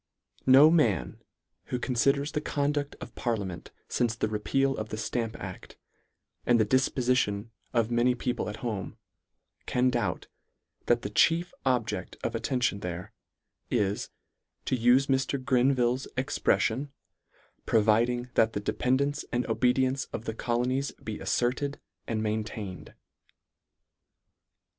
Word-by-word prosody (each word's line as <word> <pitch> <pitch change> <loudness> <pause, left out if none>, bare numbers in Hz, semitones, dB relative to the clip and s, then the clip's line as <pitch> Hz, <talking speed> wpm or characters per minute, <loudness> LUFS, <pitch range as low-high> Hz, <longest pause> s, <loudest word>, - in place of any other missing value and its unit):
No 140 +4 +8
man, 110 - +1 0.4
who 125 - -2
conliders 135 +4 +1
the 150 - -2
conduct 145 -1 -1
of - - -9
parliament 100 -7 -3 0.2
lince 120 -1 0
the 110 - 0
repeal 135 +6 0
of 110 - -5
the 110 - -4
Stamp 110 +1 -2
adf, - - -8 0.7
and 120 -1 +3
the 110 - +4
difpofition 125 -3 +1 0.2
of 115 -1 +1
many 120 +1 +3
people 125 -2 -2
at 105 - -5
home, 105 -5 -4 0.7
can 125 +1 +2
doubt, 105 -8 -1 0.6
that 120 0 +3
the 100 - -4
chief 170 +9 +3
object 125 -4 -1
of - - -1
attention 125 -6 0
there, 90 -1 -6 0.6
is, 105 -4 0 0.6
to - - +1
ufe 125 +3 +4
Mr. 135 0 0
Grenville's 130 -1 +2
expremon, 130 -1 +1 0.4
" - - -36
providing 120 +3 +2
that 110 0 +3
the - - -1
dependance 135 +7 0
and 120 +1 0
obedi 125 +1 +2
ence 130 0 -2
of 115 - -7
the 110 - -2
colonies 125 +4 0
be 110 -1 -7
alferted 135 +4 -1 0.3
and 110 -1 -1
main 110 0 0
tained." 100 -4 -8
120 Hz, 130 wpm, -28 LUFS, 110-130 Hz, 0.7 s, No